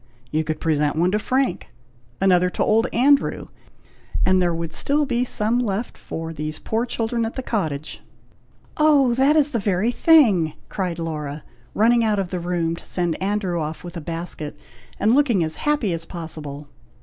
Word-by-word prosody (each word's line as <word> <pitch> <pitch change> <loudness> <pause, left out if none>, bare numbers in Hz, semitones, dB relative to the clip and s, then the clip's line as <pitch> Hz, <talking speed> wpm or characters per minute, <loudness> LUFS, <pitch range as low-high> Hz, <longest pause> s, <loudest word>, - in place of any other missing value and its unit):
You 155 +1 +1
could 155 0 -3
present 150 -2 +1
one 175 +3 +2
to 210 - +1
Frank, 260 +4 0 0.5
another 180 -2 +4
to - - -1
old 225 +3 +3
Andrew, 275 +4 +2 0.8
and 185 0 +4
there 175 -1 +2
would 165 -1 -4
still 295 +1 +1
be 245 -2 0
some 230 -1 0
left 225 -1 -2
for 165 0 -6
these 155 0 -4
poor 230 +2 -2
children 230 0 -1
at 225 - -3
the 260 - -4
cottage." 155 - -3 0.8
"Oh! 290 -5 +4
that 270 +5 +3
is 295 -2 +3
the 235 - 0
very 200 +3 +1
thing!" 220 - +4 0.2
cried 180 -4 -3
Laura, 150 -3 -4 0.3
running 235 +2 +4
out 215 -2 +1
of 190 -3 -2
the 180 - -2
room 170 -1 -1
to - - -12
send 175 -2 -2
Andrew 190 -3 -1
off 155 +1 -5
with 175 0 -9
a 170 - -5
basket, 165 -2 -5 0.4
and 220 +3 +3
looking 250 -10 +3
as 160 0 -4
happy 290 -11 +1
as 165 0 -4
possible. 155 -4 -7
185 Hz, 175 wpm, -22 LUFS, 165-235 Hz, 0.8 s, another